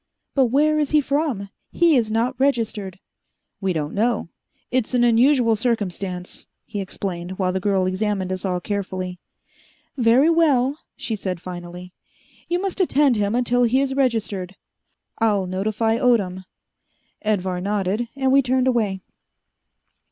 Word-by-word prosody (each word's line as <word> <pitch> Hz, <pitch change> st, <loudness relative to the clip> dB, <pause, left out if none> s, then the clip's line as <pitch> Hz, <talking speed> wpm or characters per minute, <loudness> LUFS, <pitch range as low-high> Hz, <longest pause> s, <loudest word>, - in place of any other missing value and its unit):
"But 270 Hz, -2 st, +4 dB
where 300 Hz, +5 st, +2 dB
is 295 Hz, -2 st, 0 dB
he 305 Hz, -, +4 dB
from? 280 Hz, -8 st, -1 dB, 0.2 s
He 340 Hz, -3 st, +4 dB
is 230 Hz, -4 st, +2 dB
not 230 Hz, +4 st, 0 dB
registered." 225 Hz, -8 st, 0 dB, 0.6 s
"We 195 Hz, -2 st, 0 dB
don't 155 Hz, -3 st, -3 dB
know. 220 Hz, -3 st, 0 dB, 0.4 s
It's 255 Hz, 0 st, 0 dB
an 245 Hz, -, +3 dB
unusual 240 Hz, 0 st, +4 dB
circumstance," 195 Hz, -5 st, -3 dB, 0.2 s
he 205 Hz, -2 st, -4 dB
explained, 185 Hz, -2 st, -5 dB
while 185 Hz, -2 st, 0 dB
the 190 Hz, -, 0 dB
girl 190 Hz, -1 st, +1 dB
examined 190 Hz, 0 st, -1 dB
us 185 Hz, -, -5 dB
all 180 Hz, -2 st, -1 dB
carefully. 185 Hz, -2 st, -4 dB, 0.8 s
"Very 250 Hz, +3 st, +4 dB
well," 290 Hz, -4 st, +2 dB, 0.2 s
she 225 Hz, -, -3 dB
said 185 Hz, -3 st, -4 dB
finally, 180 Hz, 0 st, -8 dB, 0.5 s
"you 350 Hz, +1 st, 0 dB
must 390 Hz, 0 st, -2 dB
attend 290 Hz, -7 st, +3 dB
him 205 Hz, +1 st, 0 dB
until 245 Hz, 0 st, +2 dB
he 245 Hz, +2 st, +3 dB
is 275 Hz, -1 st, 0 dB
registered. 220 Hz, -8 st, -1 dB, 0.6 s
I'll 210 Hz, -4 st, +2 dB
notify 215 Hz, +5 st, 0 dB
Odom." 195 Hz, -8 st, +1 dB, 0.8 s
Edvar 190 Hz, -4 st, -1 dB
nodded, 205 Hz, +3 st, -1 dB
and 265 Hz, -1 st, +1 dB
we 275 Hz, +1 st, +6 dB
turned 255 Hz, 0 st, +1 dB
away. 215 Hz, -7 st, 0 dB
220 Hz, 140 wpm, -22 LUFS, 190-255 Hz, 0.8 s, we